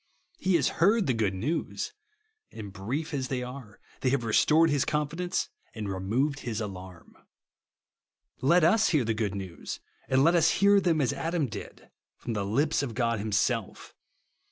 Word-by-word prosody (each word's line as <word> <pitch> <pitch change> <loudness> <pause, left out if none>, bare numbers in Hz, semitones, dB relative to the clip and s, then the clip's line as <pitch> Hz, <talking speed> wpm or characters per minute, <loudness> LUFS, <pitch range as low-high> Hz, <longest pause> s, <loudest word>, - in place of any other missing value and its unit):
He 185 -1 +2
has 145 -6 +3
heard 205 +4 +4
the 130 - +1
good 105 -4 0
news; 160 - -3 0.6
and 100 -3 -8
brief 135 +12 -4
as 130 -2 -2
they 125 -1 -2
are, 125 -4 -9 0.2
they 130 - +1
have 130 -2 +1
restored 155 +8 +4
his 145 -2 +2
confidence 155 +4 -1 0.3
and 110 -2 -4
removed 115 +10 -1
his 115 -4 -4
alarm. 95 -5 -8 1.3
Let 170 +6 +4
us 195 +6 +4
hear 150 -8 +2
the 115 - +1
good 105 -2 -2
news, 95 -3 -6 0.3
and 130 +1 +4
let 170 - +5
us 165 -2 +4
hear 200 0 +5
them 165 -4 +2
as 125 - +1
Adam 165 -2 -1
did, 110 - -9
— - - -65
from 120 - -5
the 105 -2 -1
lips 140 +11 +1
of 125 -6 -4
God 115 -3 0
himself. 110 +1 -1
130 Hz, 170 wpm, -28 LUFS, 110-160 Hz, 1.3 s, let